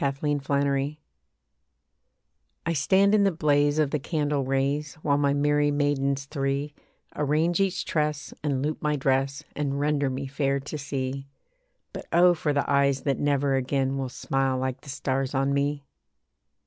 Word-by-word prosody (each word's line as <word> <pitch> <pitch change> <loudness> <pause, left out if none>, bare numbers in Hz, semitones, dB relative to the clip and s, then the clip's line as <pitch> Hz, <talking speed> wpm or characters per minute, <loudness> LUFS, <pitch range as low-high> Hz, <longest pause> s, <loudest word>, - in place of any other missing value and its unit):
THE 140 -1 0 0.3
BRIDAL 140 0 +1
EVE 145 +3 -3 1.7
I 165 - 0
stand 190 +7 +3
in 210 -1 +5
the 195 - +3
blaze 145 -2 +2
of 150 -3 +2
the 150 - 0
candle 150 -1 -1
rays, 140 +2 -1
While 145 -1 +2
my 140 -1 +2
merry 145 0 +2
maidens 140 -1 0
three 140 0 -2 0.4
Arrange 155 +4 +1
each 195 -2 0
tress, 150 -2 -1
and 140 -3 0
loop 155 0 -3
my 150 0 +1
dress, 135 +1 0
And 140 -1 -2
render 145 -1 +1
me 130 +1 -4
fair 140 0 0
to 145 +3 -6
see. 135 -1 -4 0.7
But - - -7
oh! 175 +1 +6
for 155 -3 -1
the 145 -1 0
eyes 140 -1 +2
that 140 -2 0
never 140 -1 +1
again 135 +1 0
Will 130 -1 -3
smile 135 +1 -1
like 130 0 -3
the 140 - -13
stars 135 0 -2
on 135 +1 +1
me. 140 0 -1
140 Hz, 160 wpm, -26 LUFS, 135-150 Hz, 1.7 s, oh